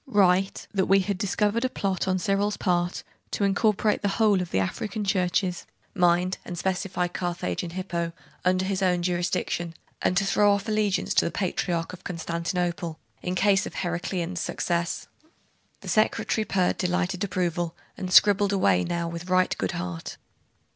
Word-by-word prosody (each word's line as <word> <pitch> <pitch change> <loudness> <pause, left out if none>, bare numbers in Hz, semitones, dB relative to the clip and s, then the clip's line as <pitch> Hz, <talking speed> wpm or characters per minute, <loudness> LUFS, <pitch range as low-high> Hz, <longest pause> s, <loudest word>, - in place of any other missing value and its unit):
Write, 195 -4 +2
that 195 -2 +1
we 195 +1 +5
had 200 +1 -1
discovered 210 +3 +1
a 255 - +1
plot 195 -5 -2
on 185 0 +2
Cyril's 200 +2 0
part 175 -1 0 0.3
to - - -2
incorporate 210 +1 +2
the 205 - +1
whole 210 -4 +4
of 180 - -4
the - - -1
African 210 - -2
churches 185 -2 0 0.3
(mind 180 -1 +2
and 175 - -6
specify 185 0 -1
Carthage 175 - -3
and 170 -1 -6
Hippo) 170 -2 -2 0.3
under 185 +1 +2
his 195 0 -1
own 180 -2 +2
jurisdiction, 175 -1 -1 0.3
and 180 - +1
to 195 - +3
throw 205 +1 +4
off 200 +2 -2
allegiance 215 -2 +1
to - - +3
the - - +1
Patriarch 175 -2 -2
of 185 - -11
Constantinople, 170 0 -2 0.2
in 180 0 -2
case 195 0 +3
of - - -9
Heraclian's 175 0 -2
success.' 170 -1 -1 0.8
The - - -11
secretary 215 0 +1
purred 185 -3 +1
delighted 180 +1 0
approval, 175 -3 -1 0.2
and 185 -1 -5
scribbled 205 +1 +6
away 95 - +3
now 170 - -2
with 170 +2 -6
right 185 0 +3
good 95 - -1
heart. 85 -1 -5
185 Hz, 160 wpm, -26 LUFS, 175-195 Hz, 0.8 s, scribbled